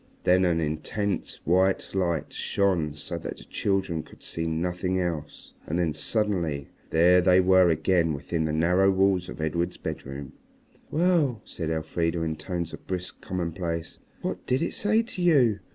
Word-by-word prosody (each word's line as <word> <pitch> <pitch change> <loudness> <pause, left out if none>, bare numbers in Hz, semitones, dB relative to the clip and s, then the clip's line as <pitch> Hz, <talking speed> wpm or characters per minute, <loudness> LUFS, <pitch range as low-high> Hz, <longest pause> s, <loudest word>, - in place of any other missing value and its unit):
Then 90 +1 +4
an 85 -2 +2
intense 85 +6 -2
white 95 +3 +2
light 85 -4 -1
shone 85 -7 0
so 75 - -5
that - - -6
the - - -12
children 95 -5 -1
could - - -17
see 80 0 -3
nothing 90 +3 -1
else. 85 -5 -4
And 80 - -1
then 85 -3 +1
suddenly 85 -4 -1 0.2
there 90 +3 +5
they 90 0 +5
were 95 -1 +5
again 80 0 +2
within 80 +3 -2
the 80 - -1
narrow 90 +5 +3
walls 95 -1 +2
of - - -8
Edred's 85 +2 -1
bedroom. 70 0 -6 0.6
"Well," 155 - +2
said 80 -3 -4
Elfrida 80 +1 -1
in 80 -1 -1
tones 85 +1 -4
of - - -10
brisk 90 -1 -4
commonplace, 85 -2 -3 0.2
"what - - -3
did 130 +5 +1
it - - -2
say 215 +3 +2
to 215 -5 -6
you? 130 - +4
90 Hz, 160 wpm, -27 LUFS, 80-95 Hz, 0.6 s, there